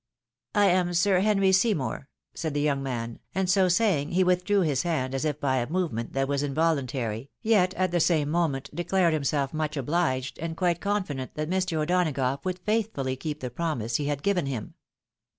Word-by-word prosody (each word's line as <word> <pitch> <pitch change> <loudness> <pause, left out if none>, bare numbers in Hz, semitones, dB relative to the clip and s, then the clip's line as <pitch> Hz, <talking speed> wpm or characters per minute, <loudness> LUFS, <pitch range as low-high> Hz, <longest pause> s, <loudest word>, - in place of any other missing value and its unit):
"I 205 -1 +5
am 180 -2 +2
Sir 185 +2 +3
Henry 195 -1 +3
Seymour," 190 - +1 0.2
said 160 -3 -4
the - - +1
young 145 -2 +1
man, 120 -3 -4 0.2
and 190 0 +1
so 185 0 +4
saying, 180 -6 +2
he 185 +1 +4
withdrew 180 +3 +2
his 145 -7 +1
hand 145 -7 -1
as 135 +3 -1
if 150 -1 -1
by 130 -3 +1
a 120 0 -1
movement 155 -10 -2
that 135 0 0
was 140 0 0
involuntary, 135 -5 -1
yet 195 -4 +3
at 185 -1 0
the 175 - +1
same 155 -3 +2
moment 150 -5 -1
declared 175 -1 +2
himself 140 -2 0
much 155 -1 -2
obhged, 135 -2 -1
and 165 0 -4
quite 175 -1 +1
confident 185 -11 -2
that 155 +2 -3
Mr. 185 -3 0
O'Donagough 150 -5 0
would 185 -1 -2
faith 215 +4 0
frdly 130 -1 -3
keep 150 0 -4
the 125 -1 -4
promise 125 -6 -1
he 145 - -3
had 145 -1 -2
given 180 -7 +1
him. 125 -6 -4
155 Hz, 190 wpm, -27 LUFS, 135-185 Hz, 0.2 s, I